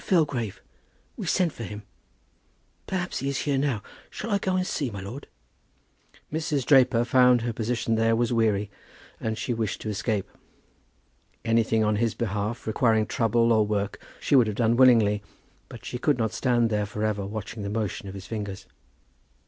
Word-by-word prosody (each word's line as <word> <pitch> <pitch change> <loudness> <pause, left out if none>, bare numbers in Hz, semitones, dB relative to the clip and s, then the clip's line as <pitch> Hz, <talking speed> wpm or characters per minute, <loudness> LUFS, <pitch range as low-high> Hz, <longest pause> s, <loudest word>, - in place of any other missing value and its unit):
Filgrave. 145 - 0 0.5
We - - -6
sent 175 -4 +2
for - - -10
him. 105 +1 -7 1.0
Perhaps 185 -1 -2
he 135 - -2
is 140 - -1
here 140 -2 0
now. 135 -7 -1 0.3
Shall 225 - -6
I 200 - +2
go 190 -1 0
and 185 0 +1
see, 140 -7 -2
my 100 -3 -7
lord?" 110 +9 -8 1.1
Mrs. 150 -4 -1
Draper 125 -4 +5
found 125 0 +5
that - - -4
her 120 - -1
position 115 0 -1
there 115 0 +3
was 120 +1 +1
weary 105 -3 +1 0.5
and 110 -1 -2
she 120 - -2
wished 110 -3 -2
to 110 - -4
escape. 100 0 -1 1.2
Anything 115 -1 +2
on 105 0 +1
his 115 0 0
behalf 110 +1 -3
requiring 110 -1 +2
trouble 115 0 +2
or 110 -1 +4
work 105 -1 -2 0.2
she - - +1
would 125 -4 +6
have 105 - -2
done 115 0 +2
willingly; 115 -5 +5 0.5
but - - -11
she 125 - -4
could 145 0 +2
not 110 -2 -1
stand 120 -3 +1
there 105 -1 0
for 105 +1 -4
ever 105 -2 0
watching 105 +2 -6
the 100 - -3
motion 105 -2 -3
of 95 - -7
his 95 -1 -8
fingers. 100 -1 -5
115 Hz, 180 wpm, -26 LUFS, 105-125 Hz, 1.2 s, would